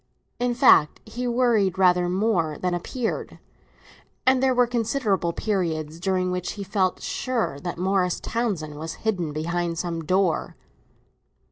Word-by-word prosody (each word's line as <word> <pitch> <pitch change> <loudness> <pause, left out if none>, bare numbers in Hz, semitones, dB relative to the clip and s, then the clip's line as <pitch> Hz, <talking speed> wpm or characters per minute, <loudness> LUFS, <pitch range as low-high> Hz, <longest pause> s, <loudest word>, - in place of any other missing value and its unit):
In 245 0 0
fact 235 - +5
he 245 +1 -4
worried 235 -6 +2
rather 180 -1 +4
more 180 -6 0
than 180 -1 -1
appeared, 225 +7 -3 0.9
and 260 0 +4
there 260 -1 +3
were 245 0 +5
considerable 230 -6 0
periods 165 -6 -2
during 185 0 0
which 180 -1 -3
he 200 - -6
felt 190 -2 0
sure 235 - -2
that 175 +2 -5
Morris 185 0 +1
Townsend 175 -11 -3
was 160 +1 -5
hidden 180 -8 0
behind 170 +2 -2
some 165 -1 -3
door. 185 0 0
185 Hz, 135 wpm, -24 LUFS, 170-230 Hz, 0.9 s, fact